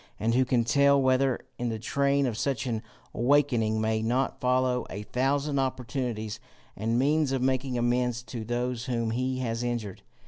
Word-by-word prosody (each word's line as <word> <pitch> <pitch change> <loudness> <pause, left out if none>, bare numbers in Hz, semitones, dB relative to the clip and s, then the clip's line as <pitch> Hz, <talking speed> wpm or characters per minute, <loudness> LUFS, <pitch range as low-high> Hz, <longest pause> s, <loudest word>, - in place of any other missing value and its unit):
And 115 +2 +1
who 130 +2 +3
can 120 -1 +2
tell 140 +3 +4
whether, 130 -1 +2 0.2
in 120 0 -1
the 110 - -2
train 140 +4 +1
of 120 -4 -1
such 130 0 -1
an 115 -3 -2 0.3
awaking, 120 -4 +2
may 110 0 0
not 125 +4 0
follow 125 0 +1
a 100 +2 -6
thousand 140 +5 0
opportunities 125 -4 -3 0.4
and 115 +4 0
means 145 +2 +2
of 135 -2 0
making 130 -1 0
amends 120 0 0
to 120 -2 -6
those 120 +1 -2
whom 115 -3 -1
he 130 +2 -1
has 115 -1 -2
injured? 120 -5 -3
125 Hz, 170 wpm, -28 LUFS, 115-135 Hz, 0.4 s, tell